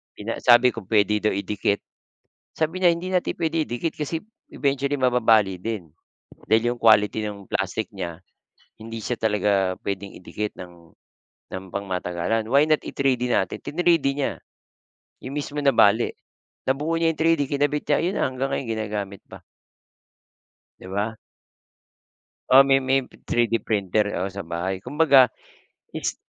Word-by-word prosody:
pina 105 +2 -5
sabi 120 0 +6
ko 115 - -7
puwede 105 -1 +2
daw - - +2
idikit. 100 0 -1 0.7
Sabi 160 +4 -1
niya 175 - +6
hindi 175 +2 -2
natin 180 - 0
puwede 160 0 0
idikit 120 +7 -2
kasi 155 +2 -3 0.3
eventually 140 0 -1
mababali 110 -7 +3
din 95 -8 -5 0.5
dahil 115 +4 +3
'yong 120 - -6
quality 110 -2 +4
ng 100 -2 -9
plastic 95 +3 -2
niya 90 -5 -6 0.6
hindi 115 0 -7
siya 120 +3 -3
talaga 100 -3 +1
puwedeng 100 0 -4
idikit 105 +3 -4
ng 85 -2 -12 0.6
ng 95 0 -5
pangmatagalan. 95 +2 -2
Why 140 +3 +5
not 155 -1 +2
i-3D 125 -3 -1
natin. 95 -5 0
Trinidi 165 -3 +2
niya 140 -1 -3 0.8
yung 135 +2 -6
mismo 145 0 -4
nabali. 120 -5 +4 0.5
Nabuo 150 +5 0
niya 165 - +2
yung - - -25
3D, 165 -3 +3
kinabit 145 +1 -1
niya, - - +3
ayun 180 +3 -1
na - - +2
hanggang 130 +1 -3
ngayon 135 - -2
ginagamit 105 -3 -4
pa. - - -10 1.4
Di - - -12
ba? 100 +4 -3 1.4
Oo, 135 - +10
may 135 0 +4
may 135 0 +1 0.2
3D 115 -1 +1
printer, 105 -1 0 0.2
oo, 95 - -2
sa 95 -2 -7
bahay. 90 +3 -3
Kumbaga 140 - +5 0.7
it's - - -3
115 Hz, 145 wpm, -24 LUFS, 100-140 Hz, 1.4 s, Oo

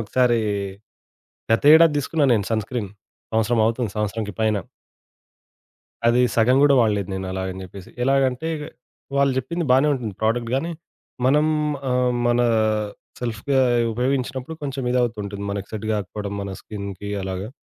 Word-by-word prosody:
ఒకసారి 120 +2 +2 1.1
గతేడాది 155 +6 +7
తీసుకున్నాను 145 -1 +1
నేను 100 -3 -1
సన్ 110 -1 +1
స్క్రీన్. 115 -6 -4 0.4
సంవత్సరం 115 +1 +2
అవుతుంది. 115 -2 -1
సంవత్సరానికి 105 0 -2
పైన. 110 -1 +2 1.5
అది 120 +1 +4
సగం 120 +3 +4
కూడా 145 -1 +6
వాడలేదు 105 -5 +1
నేను 95 0 -4
అలాగని 95 0 -4
జెప్పేసి. 95 0 -11
ఎలాగంటే 135 +2 +1 0.7
వాళ్ళు 140 0 +4
జెప్పింది 170 +7 -2
బానే 135 +4 +5
ఉంటుంది 120 -6 -4
ప్రొడక్ట్ 115 +1 0
గాని, 165 +6 -1 0.5
మనం 150 +4 +4 0.4
ఆహ్, 125 0 +2
మన 120 0 +2 0.8
సెల్ఫ్‌గా 125 +3 -1 0.3
ఉపయోగించినప్పుడు 130 +4 -2
కొంచెం 135 -1 -3
ఇదవుతూ 120 -2 +1
ఉంటుంది. 100 0 -6
మనకు 100 -1 -4
సెట్ 110 0 -4
గాకపోవడం 100 0 -4
మన 100 - -5
స్కిన్‌కి 100 -1 -7
అలాగా. 95 +3 -4
120 Hz, 130 wpm, -22 LUFS, 105-130 Hz, 1.5 s, గతేడాది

